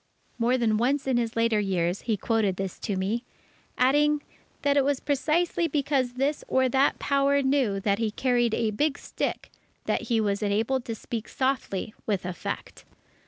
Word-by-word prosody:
_" - - -35
More 240 +2 +3
than 220 -3 +2
once 270 +5 +1
in 260 -2 +1
his 230 -1 -1
later 230 -1 +2
years, 185 -2 0
he 220 -3 -1
quoted 215 -2 +1
this 190 -1 -5
to 205 - -2
me, 200 +6 -1 0.5
adding, 290 +3 +3 0.4
that 285 0 +3
it 280 - +4
was 280 0 +1
precisely 320 +5 +1
because 275 -4 0
this 275 +4 -1
or 260 0 +3
that 270 +3 +3
Power 280 0 +2
knew 265 -7 +2
that 200 0 +1
he 225 -2 +1
carried 240 0 +1
a 225 -2 0
big 290 +6 0
stick, - - -4 0.3
that - - -1
he 230 -2 +3
was 205 -1 0
enabled 220 +5 0
to 230 - -4
speak 225 0 -6
softly 260 -7 -1
with 200 -4 -1
effect. 180 -2 -5
240 Hz, 175 wpm, -27 LUFS, 215-275 Hz, 0.5 s, it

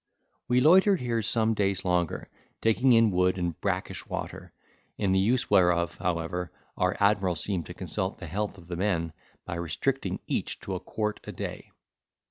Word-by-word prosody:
We 125 0 +3
loitered 190 +6 +6
here 120 -2 -1
some 110 +1 +2
days 100 -2 0
longer, 90 -2 0 0.3
taking 125 +3 +3
in 115 -2 +5
wood 90 0 +2
and 85 -3 -3
brackish - - -2
water, - - -6 0.5
in 100 -2 +1
the 95 - +3
use 120 +6 +1
whereof, 85 -2 +3
however, 90 0 -2 0.2
our 90 0 0
admiral 100 -3 +3
seemed 85 -2 0
to - - -8
consult 95 +1 -2
the 95 - -8
health 100 +5 -3
of 85 - -14
the 90 - -4
men, 85 -4 -1 0.3
by 85 - -4
restricting 85 - -2
each - - -2
to - - -5
a - - -2
quart 105 -1 -3
a - - -5
day. - - -6
95 Hz, 170 wpm, -28 LUFS, 90-110 Hz, 0.5 s, loitered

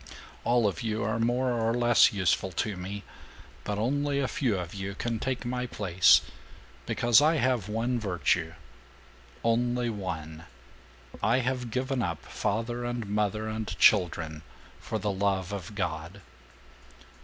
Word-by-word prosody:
All 120 -1 +3
of 95 -5 -3
you 110 -1 -2
are 110 +2 -1
more 125 +2 +1
or 115 -1 0
less 120 -1 +5
useful 95 -1 +1
to 105 +4 -1
me, 95 +3 -6 0.6
but 105 - -3
only 140 +5 0
a 135 - +1
few 125 -10 0
of 90 -2 -5
you 100 0 -5
can 115 0 -2
take 130 +1 -3
my 125 +1 -2
place, 95 -6 +4 0.7
because 120 +2 +4
I 155 +2 +4
have 125 - +1
one 120 +3 0
virtue 90 -5 0 0.9
(only 120 +1 +1
one): 80 -6 -6 0.8
I 115 +3 +3
have 125 -1 -2
given 130 +2 -1
up 85 -8 -3
father 115 +3 -2
and 120 -1 -3
mother 105 +1 -1
and 110 0 -4
children 80 -6 +3 0.4
for 110 - -3
the 105 -1 -1
love 95 -1 -1
of 100 +1 -6
God. 85 0 -4
110 Hz, 145 wpm, -28 LUFS, 95-120 Hz, 0.9 s, less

